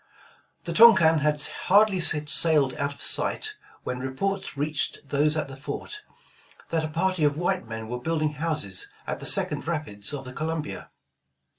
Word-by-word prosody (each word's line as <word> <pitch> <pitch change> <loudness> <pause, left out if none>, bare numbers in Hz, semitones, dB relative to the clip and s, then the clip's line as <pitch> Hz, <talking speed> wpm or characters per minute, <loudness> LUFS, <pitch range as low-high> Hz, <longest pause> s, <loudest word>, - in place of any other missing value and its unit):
The - - -4
Tonquin 190 -9 +7
had 150 0 0 0.2
hardly 200 0 +5
sailed 150 -3 +3
out 140 0 -2
of - - -5
sight, 430 -1 0 0.3
when 125 - -4
reports 140 +7 -3
reached 145 0 -2
those 150 +2 +1
at 155 - -1
the 135 - -9
fort, 145 - -6 0.7
that 165 -1 +1
a - - -1
party 170 +2 0
of 145 0 +2
white 180 +2 -1
men 110 -1 -6
were 125 +2 -4
building 155 0 -1
houses 150 - -2 0.2
at - - -4
the - - -4
second - - 0
rapids 145 -12 -3
of 140 -2 -6
the 130 - -8
Columbia. 155 +1 -4
150 Hz, 160 wpm, -26 LUFS, 140-165 Hz, 0.7 s, Tonquin